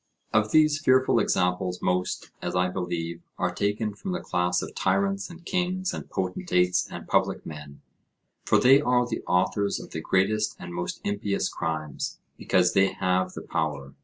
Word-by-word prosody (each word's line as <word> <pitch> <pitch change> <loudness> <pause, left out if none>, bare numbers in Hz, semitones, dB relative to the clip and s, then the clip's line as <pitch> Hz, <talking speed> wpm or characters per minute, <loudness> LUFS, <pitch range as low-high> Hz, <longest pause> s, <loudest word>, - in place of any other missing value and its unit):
Of 110 0 +3
these 155 +2 +4
fearful 130 -4 +4
examples, 90 -2 0
most, 90 0 -1
as - - -3
I 90 0 +2
believe, 85 -2 -3 0.2
are 90 0 0
taken 105 +2 -1
from 180 - -5
the 180 - -2
class 90 - 0
of - - -7
tyrants 100 +1 0
and 170 0 -12
kings 185 +1 -1
and - - -7
potentates 90 - +1
and - - -8
public - - +1
men, 75 -2 -9 0.6
for - - +3
they 135 +3 +6
are 125 -3 +2
the 120 -2 -4
authors 95 +2 +1
of - - -10
the 80 - -4
greatest 105 +6 +1
and 85 -1 -8
most 90 0 -4
impious 100 -1 -1
crimes, 80 -3 -3 0.2
because 90 -2 +2
they 95 0 +3
have 95 0 0
the - - -7
power. 75 -5 -3
95 Hz, 165 wpm, -26 LUFS, 90-110 Hz, 0.6 s, they